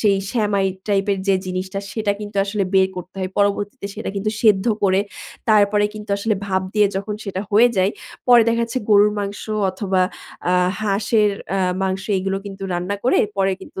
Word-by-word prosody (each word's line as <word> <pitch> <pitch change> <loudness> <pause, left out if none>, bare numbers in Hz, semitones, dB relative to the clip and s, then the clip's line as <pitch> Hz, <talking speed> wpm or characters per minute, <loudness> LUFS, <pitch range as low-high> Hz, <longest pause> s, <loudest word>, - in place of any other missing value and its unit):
সেই 205 -3 +3 0.2
সেমাই 205 -4 +1 0.2
টাইপের 200 0 +1
যে 195 - +5
জিনিসটা 185 +1 -3
সেটা 215 -2 0
কিন্তু 205 -1 -7
আসলে 200 0 -1
বের 190 0 +5
করতে 180 0 -8
হয়। 185 0 -2
পরবর্তীতে 205 +2 0
সেটা 220 - -5
কিন্তু 205 +2 -1
সেদ্ধ 210 -3 +4 0.2
করে 190 -1 +3 0.5
তারপরে 210 -1 +4
কিন্তু 210 -1 -8
আসলে 215 +1 0
ভাব 190 -1 0
দিয়ে 210 -1 +5
যখন 205 +2 -3
সেটা 190 -2 -3
হয়ে 225 +4 +6
যায় 190 +1 +3 0.4
পরে 245 -2 +7
দেখা 230 0 +1
যাচ্ছে 230 +2 -3
গরুর 210 0 +5
মাংস 200 0 -4 0.3
অথবা 190 -1 0 0.5
আ - - +3 0.3
হাঁসের 210 +1 +2 0.3
আ - - 0 0.2
মাংস 190 0 -1 0.2
এগুলো 195 +1 -1
কিন্তু 195 0 -8
রান্না 180 +3 -2
করে 255 - +4 0.2
পরে 195 0 +2
কিন্তু 190 - -9
200 Hz, 180 wpm, -21 LUFS, 195-210 Hz, 0.5 s, পরে